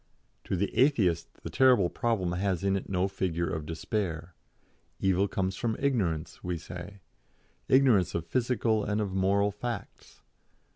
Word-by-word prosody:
To - - -1
the 100 +3 -2
Atheist 110 - +2
the - - -6
terrible 125 -8 +5
problem 95 -3 -1
has 95 0 -1
in 100 0 +2
it 95 - -4
no 95 0 +1
figure 90 -3 -2
of 80 -2 -4
despair. 85 -1 -3 0.7
Evil 95 +1 +2
comes 95 -1 -2
from 110 +2 -2
ignorance, 95 - -1
we 90 -1 -2
say; 90 +4 -9 0.7
ignorance 130 -9 +4
of 85 - -2
physical 115 -1 +1
and 105 +1 -1
of 100 -3 -2
moral 100 +2 +2
facts. 120 +4 -7
95 Hz, 145 wpm, -29 LUFS, 90-110 Hz, 0.7 s, terrible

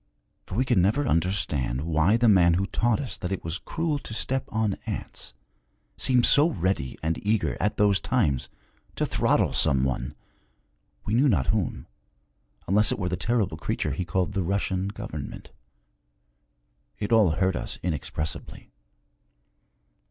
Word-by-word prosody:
For - - -6
we 130 +4 +1
could 120 -6 +2
never 110 +10 +2
understand 80 - 0
why 80 +6 +2
the 120 0 +3
man 90 -5 +5
who 95 +3 0
taught 115 +2 0
us 135 - -4
that 90 - -4
it 95 - -3
was 85 +2 -4
cruel 160 -3 -2
to 110 - -8
step 130 +3 -1
on 110 -2 0
ants, - - -5 0.6
seemed 125 -2 +4
so 150 +4 +7
ready 90 - -2
and 80 +1 -2
eager, 105 +1 +1
at 105 - 0
those 100 -2 +3
times, 90 - 0 0.5
to - - 0
throttle - - +1
some 65 -1 +2
one, 65 +1 -2 0.9
we 105 - -2
knew 135 +5 +4
not 75 - +2
whom, - - -2 0.8
unless 105 +3 +4
it - - -1
were 90 -3 -2
the 90 - -1
terrible 115 -1 -1
creature - - -2
he 90 - -2
called 90 +2 -1
the 95 - 0
Russian 95 +1 -1
government. 100 - -7 1.5
It 105 - -4
all 105 -8 +5
hurt 95 +1 +1
us - - -4
inexpressibly. 80 -1 -4
95 Hz, 150 wpm, -26 LUFS, 85-110 Hz, 1.5 s, so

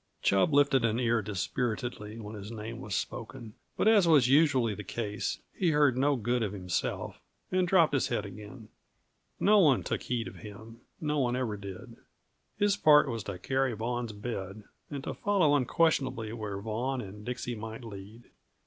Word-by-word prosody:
Chub 100 +9 +3
lifted 140 -3 +4
an 115 +1 +1
ear 120 -2 +2
dispiritedly 105 +2 -3
when 105 -1 -8
his 105 -1 -8
name 115 +1 -6
was 105 -8 -4
spoken; 110 -3 -5 0.2
but, - - +2
as 210 -5 +6
was 145 -7 +6
usually 135 -5 +4
the 105 - -7
case, 105 +1 -3 0.2
he 180 - +1
heard 145 -4 +4
no 140 +2 +2
good 120 +1 0
of 105 -3 -1
himself, 90 -3 -3 0.3
and 185 -1 +2
dropped 170 -5 +4
his 135 - +2
head 105 - -2
again. 105 +3 -10 0.7
No 210 +1 +5
one 145 -9 +4
took - - -2
heed 120 -2 -2
of - - -10
him; 110 +2 -11 0.2
no 150 -1 -1
one 125 -2 +1
ever 125 -5 -1
did. 100 -2 -9 0.6
His 205 -1 +3
part 150 -5 +6
was 115 -4 -3
to 100 -3 -5
carry 130 +6 0
Vaughan's 120 +1 -3
bed, 105 -1 -6 0.3
and 140 -2 -5
to - - -4
follow 185 -8 +2
unquestionably 135 -5 +1
where 105 -4 -5
Vaughan 120 +6 -2
and 105 -1 -8
Dixie 125 +1 -4
might 110 +1 -7
lead. 105 +1 -10
120 Hz, 175 wpm, -30 LUFS, 105-140 Hz, 0.7 s, as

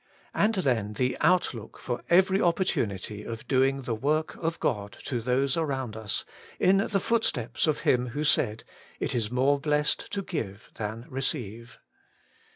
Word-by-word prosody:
And 220 +2 +2
then 120 - 0
the 125 +4 0
outlook 130 - +1
for 120 -2 -4
every 190 +2 +5
opportunity 105 - 0
of 115 0 -7
doing 135 0 +2
the 120 - -2
work 150 +7 0
of 165 0 -2
God 105 -5 -2
to 120 -3 -2
those 130 +3 +1
around 135 -8 -2
us, 110 -2 -2 0.3
in 190 +1 +5
the 200 0 +1
footsteps 180 - 0
of 155 - +1
Him 125 0 +2
who 145 +5 -3
said, 115 -7 +2 0.2
' - - -23
It - - -1
is 115 -4 0
more 135 +4 +2
blessed 150 0 0
to 200 -1 -1
give 115 - -5
than 110 +2 -5
receive.' 120 -3 -3
130 Hz, 160 wpm, -28 LUFS, 115-155 Hz, 0.3 s, every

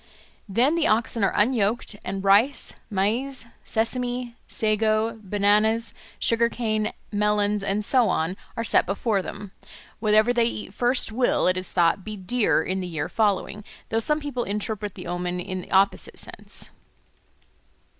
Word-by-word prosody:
Then 240 +9 +3
the 335 -2 +2
oxen 225 0 +1
are 195 - +3
unyoked, 220 -1 +1
and 195 +1 -4
rice, 210 +8 +3 0.2
maize, 230 +6 -1 0.2
sesame, 245 +1 0
sago, 220 +1 +1
bananas, 210 +3 +2 0.2
sugar 235 0 +2
cane, 215 -3 -1 0.2
melons, 210 0 +1
and 200 +2 -1
so 245 -4 +4
on, 165 +1 0 0.2
are 230 - -1
set 230 - +3
before 200 +1 0
them; 200 +1 -8 0.5
whatever 215 +2 +3
they 235 -1 +3
eat 210 -4 -4
first 245 +1 +1
will, 245 +3 +1
it 185 - +3
is 185 0 -4
thought, 175 +2 +2
be 215 +1 -6
dear 210 +5 +1
in 190 +1 -2
the 185 - -4
year 160 -4 -3
following, 210 -1 0 0.3
though 225 - +1
some 300 +7 +1
people 285 -5 -3
interpret 210 0 -4
the - - -9
omen 175 +1 -3
in 185 +1 -4
the - - -13
opposite 195 +1 +2
sense. - - -6
215 Hz, 150 wpm, -24 LUFS, 195-235 Hz, 0.5 s, so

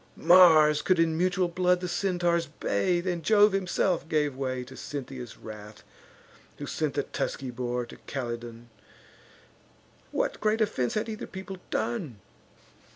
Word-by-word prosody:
Mars 160 -4 +6
could 185 - +2
in 165 -1 +2
mutual 180 +2 +1
blood 180 +1 +2
the 180 - -4
Centaurs 175 -2 0
bathe, 155 - -1
And 175 -2 -1
Jove 210 +3 +5
himself 185 -3 0
gave 150 -3 +1
way 130 -1 -3
to 130 +1 -12
Cynthia's 130 -4 -7
wrath, 105 -1 -11 0.7
Who - - -6
sent - - -2
the - - +1
tusky 130 -2 -4
boar 125 0 -3
to - - -13
Calydon; 120 -2 -6 1.4
What - - -2
great 215 +1 +1
offence 130 - 0
had 215 - -1
either 220 -1 -6
people 190 0 -8
done? 205 - -2
165 Hz, 140 wpm, -28 LUFS, 130-185 Hz, 1.4 s, Mars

